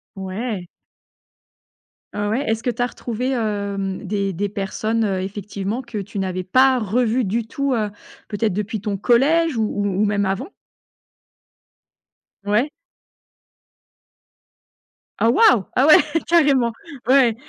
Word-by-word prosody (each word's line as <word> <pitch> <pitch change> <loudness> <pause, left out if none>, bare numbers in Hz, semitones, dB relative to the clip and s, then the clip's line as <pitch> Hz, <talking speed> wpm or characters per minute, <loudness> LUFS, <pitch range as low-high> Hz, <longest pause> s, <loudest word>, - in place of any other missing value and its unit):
Ouais. 190 0 -4 1.5
Heu, 205 0 -1
ouais, 225 +6 0
est-ce 225 0 -1
que - - -3
tu 240 +1 -3
as - - +3
retrouvé, 245 +1 -4
hem, 200 -5 -2
des 200 0 -1
des 200 +4 -1
personnes, 215 +3 -1
heu, 190 -3 -1
effectivement, 200 +3 -4
que 235 -4 -6
tu 200 0 -6
n'avais 185 -1 -2
pas 260 +6 +4
revues 235 +3 +1
du 220 +3 -1
tout, 275 +4 -2
heu, 215 -3 -1 0.4
peut-être 215 0 -1
depuis 210 +3 -3
ton 205 -1 -2
collège 280 - +3
ou 225 - +1
ou 205 -1 -2 0.2
ou - - +4
même 205 -1 +1
avant? 210 - -3 1.9
Ouais. 215 +8 +1 2.5
Ah 225 - +3
waouh! 330 - +5
Ah 260 - +4
ouais, 305 - +9 0.3
carrément. 280 -8 +3 0.3
Ouais. 255 -3 +5
215 Hz, 130 wpm, -21 LUFS, 200-250 Hz, 2.5 s, ouais